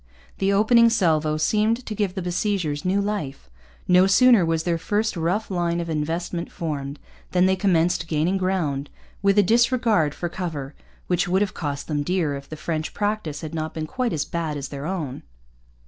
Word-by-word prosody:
The 195 0 +2
opening 230 +3 +5
salvo 160 -8 +2
seemed 215 +8 +1
to 215 - -4
give 205 -3 -1
the 190 - -3
besiegers 175 -4 -1
new 190 +2 +1
life. 195 - -4 0.4
No 180 +1 +5
sooner 235 +1 +6
was 165 -1 0
their 170 -2 0
first 210 +5 -1
rough 180 +6 -1
line 175 -2 0
of 170 -1 -3
investment 165 +3 -3
formed 145 -3 -4 0.4
than 180 0 +4
they 190 0 +3
commenced 175 -3 +1
gaining 160 +5 +1
ground, 155 -7 -1 0.3
with 200 +1 +3
a 205 - +7
disregard 230 - +2
for 175 - -3
cover 160 -6 -5 0.3
which 180 +1 0
would 190 +3 +2
have 205 - -4
cost 145 -3 -4
them 150 -2 -1
dear 165 -1 0
if 140 0 -8
the 155 - -6
French 155 0 -3
practice 205 -7 -2
had 160 -1 -6
not 155 -1 -4
been 160 -1 -3
quite 250 +7 -2
as 155 -4 -1
bad 160 -3 -3
as 140 -1 -5
their 140 +1 -5
own. 160 -8 -4
175 Hz, 185 wpm, -23 LUFS, 155-200 Hz, 0.4 s, a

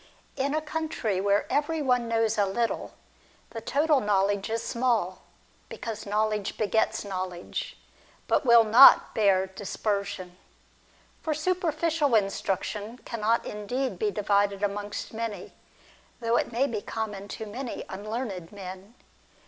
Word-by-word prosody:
In 280 +2 0
a 310 - +1
country 300 -11 -2
where 200 +1 +2
every 305 +2 +1
one 250 -4 +1
knows 225 -1 +1
a 200 - +3
little, 230 +4 -2 0.6
the 225 - -6
total 290 +5 +2
knowledge 200 -1 +1
is 225 +1 -2
small; 235 -7 0 0.5
because 220 -2 -6
knowledge 210 0 0
begets 220 0 +1
knowledge, 185 -2 -5 0.5
but - - +2
will 235 -3 +7
not 230 +5 +8
bear 195 -3 +3
dispersion. 200 -1 -3 0.8
For 310 -2 -1
superficial 330 -4 +1
instruction 205 +2 -1
cannot 230 0 0
indeed 245 +6 -3
be 430 - +1
divided 200 - +1
amongst 205 +1 -3
many, 225 -2 -5 0.7
though 230 -1 +1
it - - 0
may 245 +4 +2
be 225 -7 -3
common 205 -3 -5
to 220 - -5
many 240 +4 -6
unlearned 205 -3 -5
men. 195 +2 -9
220 Hz, 125 wpm, -27 LUFS, 200-250 Hz, 0.8 s, not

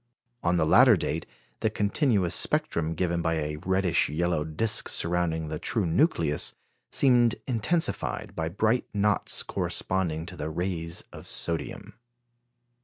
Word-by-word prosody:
On 85 +1 +1
the 80 - +2
latter 80 - +6
date, - - -3 0.3
the 110 - +1
continuous 105 - +1
spectrum 80 0 +1
given 85 0 0
by 80 0 0
a 75 -1 -3
reddish 95 -2 +2
yellow 85 0 0
disc 100 +8 0
surrounding 85 -2 0
the 75 -1 -4
true 115 -7 0
nucleus 85 - +1 0.4
seemed 120 -4 +4
intensified 135 +8 -1
by 80 0 -2
bright 110 +7 +1
knots 105 0 +2
corresponding 85 -4 -2
to 90 - -9
the 75 -2 -4
rays 85 0 -3
of - - -10
sodium. 80 -4 -3
85 Hz, 130 wpm, -27 LUFS, 80-105 Hz, 0.4 s, latter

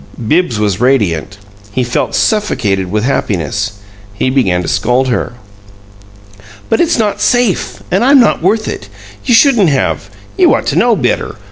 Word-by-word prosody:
Bibbs 160 -4 +1
was 105 -1 -1
radiant; 105 - 0 0.3
he 130 +4 -1
felt 120 0 -2
suffocated 105 - 0
with 105 +3 -1
happiness. 105 - -2 0.4
He 130 +5 -1
began 95 -10 +1
to - - -5
scold 125 +8 0
her. 120 - -2 1.4
"But 225 - +2
it's 340 -3 +1
not 215 -3 -1
safe, 245 -6 0
and 190 +5 +2
I'm 275 +2 +5
not 240 - +2
worth 215 +5 +1
it. 100 - -6 0.3
You 240 - +3
shouldn't 230 - +4
have 140 -2 -1 0.3
you 360 -2 +5
ought - - -3
to - - -1
know - - +3
better. - - -2
130 Hz, 155 wpm, -13 LUFS, -, 1.4 s, I'm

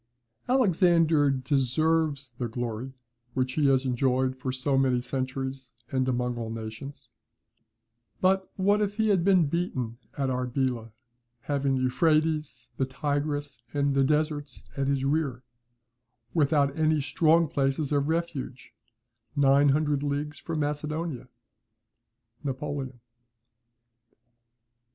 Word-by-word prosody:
"Alexander 170 - +4
deserves 140 +1 +1
the 120 - -1
glory 120 +2 -4 0.4
which 130 -1 0
he 150 -1 +2
has 135 -1 +3
enjoyed 130 +1 +1
for 130 0 -3
so 130 +2 0
many 130 -2 +3
centuries 130 0 -4 0.2
and 130 -1 +1
among 125 -1 -1
all 115 -1 -4
nations; 115 +5 -7 1.1
but 190 +1 +2
what 200 +2 +2
if 205 -1 -1
he 220 0 +1
had 190 -4 +3
been 185 -3 +5
beaten 135 -8 -2 0.2
at 140 -2 0
Arbela 125 -2 -1 0.5
having 140 +1 0
the 130 - 0
Euphrates, 155 -2 +1
the 135 - +1
Tigris, 145 -1 -2 0.2
and 140 -1 +2
the 135 0 +3
deserts 150 -1 -1
in 135 -1 -1
his 135 -1 0
rear, 140 -4 0 0.9
without 145 -3 +2
any 155 -1 +2
strong 160 +3 +3
places 140 -1 0
of 145 -1 +1
refuge, 160 -6 -3 0.6
nine 140 0 +5
hundred 145 0 +2
leagues 145 +1 -3
from 165 -2 -3
Macedonia?" 150 -2 -3 1.2
NAPOLEON. 135 -2 -4
140 Hz, 115 wpm, -27 LUFS, 130-155 Hz, 1.2 s, been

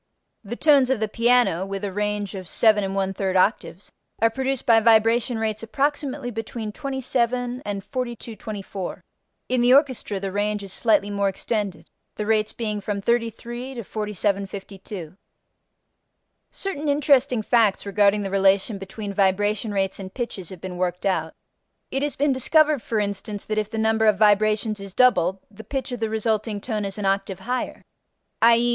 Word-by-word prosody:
The 220 +3 -5
tones 280 -3 +4
of 265 -4 +1
the 220 - 0
piano 230 -5 +3
(with 195 +1 -5
a 200 - -2
range 210 0 -2
of 185 -3 -7
7 215 0 +3
1/3 195 0 -1
octaves) 190 0 0 0.3
are 225 0 +3
produced 265 +1 -2
by 230 -1 +6
vibration 225 +1 +3
rates 220 -1 -2
approximately 275 +2 -1
between 225 -1 -5
27 250 -1 -1
and 200 -1 -4
4224. 220 -6 -6 0.4
In 255 -1 +1
the 245 +2 +6
orchestra 260 -8 +1
the 195 0 -4
range 205 +1 -1
is 195 -1 -7
slightly 205 -3 +2
more 200 -1 +1
extended, 195 -4 -3 0.3
the 210 - -3
rates 215 0 +1
being 215 -3 -3
from 200 0 -3
33 240 +3 -2
to 235 - -5
4752. 200 -3 -4 1.3
Certain 305 -7 -4
interesting 275 -4 +3
facts 220 -4 +2
regarding 205 0 +3
the 195 - -4
relation 195 +1 +2
between 200 +1 -6
vibration 205 +2 +1
rates 195 -1 -1
and 190 -1 -8
pitches 220 -8 -5
have 185 - -9
been 180 0 -7
worked 180 0 -2
out: 165 -5 0 0.6
it 270 - -1
has 290 0 -1
been 285 0 +2
discovered 300 +2 +3
for 225 -1 -1
instance 205 0 -3
that 215 0 -1
if 210 -1 -3
the 225 - -5
number 220 0 +2
of 210 -2 +4
vibrations 215 0 +3
is 195 -1 -9
doubled, 195 -8 +4
the 220 +1 -11
pitch 265 +3 -4
of 245 - -4
the 225 -1 -1
resulting 220 -1 -1
tone 215 -1 -3
is 195 0 -5
an 205 - -3
octave 195 -1 -1
higher; 250 +5 -3 0.6
_i.e. 235 +1 +5
215 Hz, 165 wpm, -23 LUFS, 195-240 Hz, 1.3 s, by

